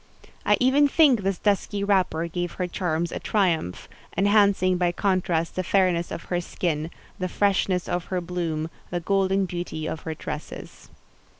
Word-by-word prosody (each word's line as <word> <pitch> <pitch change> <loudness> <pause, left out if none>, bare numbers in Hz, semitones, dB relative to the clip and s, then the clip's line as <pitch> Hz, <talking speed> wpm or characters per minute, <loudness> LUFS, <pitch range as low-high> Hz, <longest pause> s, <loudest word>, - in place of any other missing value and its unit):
I - - +5
even 270 +3 +4
think 280 -6 +4
this 195 -1 -1
dusky 205 0 0
wrapper 185 -5 +1
gave 175 +1 -3
her 180 - -2
charms 170 -2 -2
a - - -4
triumph; 170 - 0 0.3
enhancing 200 -2 +4
by 175 -1 +2
contrast 175 -3 0
the 185 - -1
fairness 180 -2 +2
of - - -6
her 175 -1 -2
skin, 160 -2 -2 0.3
the 185 0 -2
freshness 190 -2 +1
of 175 -1 -2
her 185 - -2
bloom, 165 -3 -3 0.2
the 175 - -2
golden 195 +2 +1
beauty 175 -3 -5
of 160 - -4
her 160 0 -5
tresses. - - -8
180 Hz, 160 wpm, -25 LUFS, 170-195 Hz, 0.3 s, I